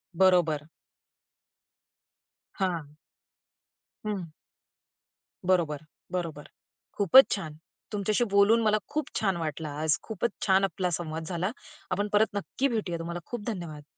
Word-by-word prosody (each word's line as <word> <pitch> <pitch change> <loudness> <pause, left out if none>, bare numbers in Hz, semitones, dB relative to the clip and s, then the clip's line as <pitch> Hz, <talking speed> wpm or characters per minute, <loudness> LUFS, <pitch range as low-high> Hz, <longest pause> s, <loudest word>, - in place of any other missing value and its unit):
बरोबर. 165 -5 +3 1.9
हां. 165 -6 -2 1.1
हं. 200 -5 -2 1.2
बरोबर, 170 -5 +2 0.3
बरोबर. 165 -5 -4 0.5
खूपच 210 +7 +8
छान! 155 -6 -6 0.4
तुमच्याशी 210 +3 +1
बोलून 200 +3 +5
मला 215 -1 +3
खूप 305 +1 -2
छान 195 -4 +1
वाटलं 155 -1 -3
आज. 150 +1 0
खूपच 220 +1 -2 0.2
छान 190 0 +5
आपला 190 -1 0
संवाद 160 -1 -3
झाला. 180 +3 -1 0.4
आपण 205 +3 0
परत 215 +1 +5
नक्की 230 +7 0
भेटूया, 210 -9 -2
तुम्हाला 170 +1 -4
खूप 235 -4 -6
धन्यवाद. 170 -9 -5
185 Hz, 110 wpm, -28 LUFS, 165-205 Hz, 1.9 s, खूपच